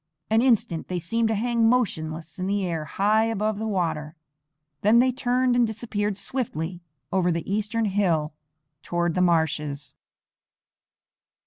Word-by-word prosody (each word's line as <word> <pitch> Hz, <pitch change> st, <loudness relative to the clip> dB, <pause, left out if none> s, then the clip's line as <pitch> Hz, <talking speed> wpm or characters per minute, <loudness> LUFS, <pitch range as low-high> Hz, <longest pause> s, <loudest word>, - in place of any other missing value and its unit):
An 220 Hz, +1 st, +5 dB
instant 225 Hz, -10 st, +1 dB
they 180 Hz, -, -2 dB
seemed 225 Hz, +7 st, 0 dB
to 220 Hz, -, 0 dB
hang 230 Hz, +1 st, +2 dB
motionless 165 Hz, -10 st, -1 dB
in 185 Hz, -, -2 dB
the 200 Hz, -1 st, 0 dB
air 165 Hz, -3 st, -2 dB
high 210 Hz, +7 st, +2 dB
above 215 Hz, -1 st, -1 dB
the 220 Hz, -, -2 dB
water, 160 Hz, -6 st, -2 dB, 0.7 s
then 215 Hz, +3 st, +5 dB
they 255 Hz, +2 st, +5 dB
turned 250 Hz, 0 st, +1 dB
and 240 Hz, -1 st, +4 dB
disappeared 210 Hz, -2 st, -2 dB
swiftly 180 Hz, -, -4 dB, 0.3 s
over 180 Hz, -2 st, +2 dB
the 165 Hz, -1 st, -3 dB
eastern 215 Hz, +3 st, 0 dB
hill 175 Hz, -7 st, +1 dB, 0.5 s
toward 175 Hz, 0 st, -1 dB
the 180 Hz, -, +1 dB
marshes. 150 Hz, -4 st, 0 dB
200 Hz, 140 wpm, -25 LUFS, 170-225 Hz, 0.7 s, An